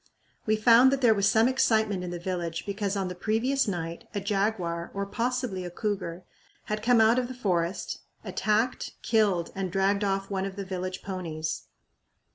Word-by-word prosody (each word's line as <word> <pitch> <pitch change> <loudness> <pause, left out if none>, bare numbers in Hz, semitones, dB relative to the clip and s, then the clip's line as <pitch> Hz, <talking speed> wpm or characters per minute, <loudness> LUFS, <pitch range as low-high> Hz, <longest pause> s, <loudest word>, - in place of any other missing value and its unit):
We 215 - +4
found 235 +4 +6
that 275 0 0
there 235 -3 +6
was 200 -1 +2
some 225 +1 +4
excitement 220 -7 +2
in 180 - -4
the 175 - -4
village 175 -2 -3
because 200 0 -2
on 190 -1 -1
the 180 - -4
previous 225 +8 0
night 170 -3 -4
a - - +1
jaguar, 195 -4 -1
or 200 0 -1
possibly 235 -2 -2
a 175 - -5
cougar, 185 -2 -3 0.4
had 215 0 -3
come 240 +1 +4
out 225 +3 +5
of 250 - -2
the 255 - -7
forest, 180 -6 -1 0.2
attacked, 220 +4 0
killed, 205 -7 +2
and 190 -2 -3
dragged 195 +2 +2
off 195 0 -1
one 190 -1 -1
of 195 -1 -5
the 200 -1 -5
village 185 0 -4
ponies. 165 -5 -4
200 Hz, 180 wpm, -28 LUFS, 180-220 Hz, 0.4 s, found